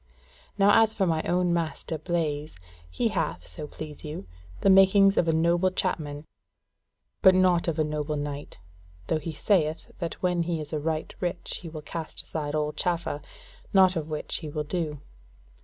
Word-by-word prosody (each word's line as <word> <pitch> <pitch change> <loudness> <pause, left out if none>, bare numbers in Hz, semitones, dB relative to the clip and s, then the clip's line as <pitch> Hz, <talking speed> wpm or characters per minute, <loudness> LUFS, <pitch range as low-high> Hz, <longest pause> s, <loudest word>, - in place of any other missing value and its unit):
Now 205 +2 +6
as 220 0 +2
for 195 - +2
my 160 -3 +1
own 180 0 +2
master 160 -1 -2
Blaise, 155 - -2 0.3
he 80 - 0
hath, - - -2
so 85 - -7
please 150 0 -9
you, 150 -9 -6 0.4
the 195 - +4
makings 195 +1 +6
of 170 - +2
a - - +4
noble 170 +3 +3
chapman, 155 -5 -3 1.0
but 190 -2 +7
not 180 -2 +3
of 165 -2 0
a 155 - +3
noble 150 0 -2
knight; 145 0 -5 0.5
though 155 - 0
he 160 +2 -5
sayeth 155 0 0
that 170 -2 -3
when 180 -1 0
he 170 -1 -1
is 150 0 -7
right 155 +1 -2
rich 175 -2 -3
he 170 - -7
will 155 -1 -8
cast 160 0 -5
aside 150 -2 -3
all 150 0 0
chaffer; 170 -2 -2 0.5
naught 190 -1 +6
of 160 -1 -3
which 155 -1 -3
he 155 - -6
will 150 +1 -2
do. 150 -2 -3
160 Hz, 175 wpm, -27 LUFS, 150-180 Hz, 1.0 s, but